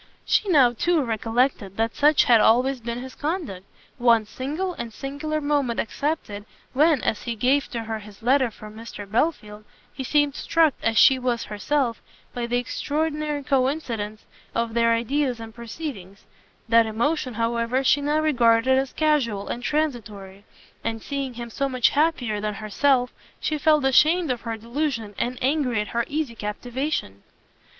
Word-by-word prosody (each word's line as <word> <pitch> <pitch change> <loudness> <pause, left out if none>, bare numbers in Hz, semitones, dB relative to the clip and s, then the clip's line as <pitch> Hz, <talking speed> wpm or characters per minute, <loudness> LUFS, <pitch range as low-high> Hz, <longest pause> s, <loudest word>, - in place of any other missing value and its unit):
She 415 - +1
now, 270 -8 +5
too, 330 +6 +1
recollected 225 -3 -1
that 225 +1 0
such 300 +1 +5
had 235 -3 +5
always 255 +4 +3
been 235 +2 -4
his 260 - -9
conduct, 295 - -4 0.3
one 235 -2 +4
single 300 - -4
and 235 -8 -6
singular 285 +5 -4
moment 285 -5 0
excepted, 225 -6 -3 0.3
when, 300 -1 +3
as 215 - -1
he 235 -2 -4
gave 260 +6 +1
to 235 - -4
her 220 0 -4
his 205 0 -14
letter 260 +1 +3
for 215 -1 -12
Mr 220 -1 -9
Belfield, 215 -3 -1 0.3
he 265 - -5
seemed 290 +1 +2
struck 320 -1 +2
as 225 -1 0
she 265 +2 +6
was 245 -2 -1
herself 235 +3 -1 0.3
by 240 -1 -3
the 245 +1 0
extraordinary 300 +3 -2
co 265 -2 +2
incidence 225 -8 -5 0.3
of 230 -1 -1
their 230 0 +3
ideas 245 +2 0
and 225 -1 -9
proceedings: 230 - -8 0.4
that 230 0 +5
emotion, 250 +3 -1
however, 230 +3 0
she 285 +2 +3
now 295 +2 +1
regarded 255 -3 +3
as 270 -1 -3
casual 265 -10 0
and 240 - -4
transitory, 215 -10 -3 0.4
and 225 -1 -3
seeing 275 -3 -4
him 235 0 -7
so 275 +3 -1
much 255 -2 +3
happier 265 -9 0
than 210 -1 -2
herself, 245 +5 +1 0.3
she 310 - -1
felt 305 -2 +3
ashamed 310 +4 +4
of 245 - -3
her 230 -1 -4
delusion, 235 -2 -3
and 250 +1 -1
angry 265 -4 +1
at 210 - -3
her 235 0 -1
easy 295 -5 -2
captivation. 230 - -4
245 Hz, 160 wpm, -24 LUFS, 225-290 Hz, 0.4 s, she